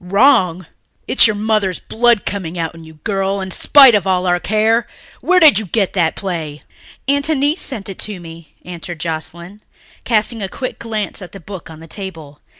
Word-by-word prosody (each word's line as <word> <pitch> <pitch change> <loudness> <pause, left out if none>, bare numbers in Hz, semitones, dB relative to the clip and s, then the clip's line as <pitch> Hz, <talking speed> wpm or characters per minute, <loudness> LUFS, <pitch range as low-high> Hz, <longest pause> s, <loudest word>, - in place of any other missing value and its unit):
"Wrong! 185 -3 +3 0.4
It's 265 - +6
your 215 - -1
mother's 210 -3 0
blood 235 -2 +1
coming 180 -4 -4
out 165 -1 -3
in 165 -1 -13
you, 160 0 -14
girl, 195 -1 -1
in 190 -1 -5
spite 270 +2 +6
of 200 -3 +1
all 185 -1 +1
our 175 -1 +2
care! 220 +4 +1 0.3
Where 365 +1 +3
did 305 - +6
you 215 - -6
get 195 +1 0
that 170 -4 +1
play?" 160 -6 -5 0.4
"Aunt 285 +2 +2
Annice 295 +2 +1
sent 220 -8 -2
it 195 - -8
to 210 -3 -3
me," 165 -1 -13
answered 175 -1 -8
Joscelyn, 170 +4 -6 0.4
casting 225 0 0
a 195 - -3
quick 255 +6 -6
glance 215 -3 -4
at 180 - -10
the 195 - -9
book 190 -1 -10
on 160 0 -12
the - - -11
table. 165 -6 -9
195 Hz, 190 wpm, -17 LUFS, 170-220 Hz, 0.4 s, It's